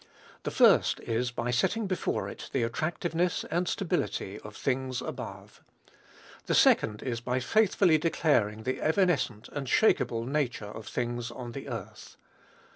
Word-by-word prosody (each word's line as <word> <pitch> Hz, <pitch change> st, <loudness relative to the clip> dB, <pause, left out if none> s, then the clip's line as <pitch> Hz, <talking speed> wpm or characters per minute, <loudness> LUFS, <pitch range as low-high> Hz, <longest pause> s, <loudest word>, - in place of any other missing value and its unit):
The -, -, -3 dB
first -, -, +4 dB
is, 120 Hz, +2 st, -1 dB
by 120 Hz, 0 st, -2 dB
setting 205 Hz, -, +1 dB
before 185 Hz, -2 st, -1 dB
it -, -, -8 dB
the 130 Hz, -, +1 dB
attractiveness 165 Hz, +7 st, -1 dB
and 175 Hz, +2 st, 0 dB
stability 175 Hz, -, -2 dB
of 105 Hz, -1 st, -11 dB
"things 130 Hz, -1 st, -1 dB
above." -, -, -7 dB, 0.9 s
The -, -, +2 dB
second 105 Hz, -1 st, +4 dB
is, 120 Hz, -3 st, -3 dB
by 125 Hz, +2 st, -1 dB
faithfully 185 Hz, -, +3 dB
declaring 115 Hz, -10 st, +1 dB
the 130 Hz, +2 st, -2 dB
evanescent 155 Hz, -, +1 dB
and 145 Hz, -2 st, -5 dB
shakeable 115 Hz, -, +2 dB
nature 130 Hz, -5 st, -1 dB
of 105 Hz, +1 st, -9 dB
"things 120 Hz, -1 st, -3 dB
on 120 Hz, 0 st, -7 dB
the -, -, -7 dB
earth." -, -, -8 dB
130 Hz, 140 wpm, -29 LUFS, 115-165 Hz, 0.9 s, first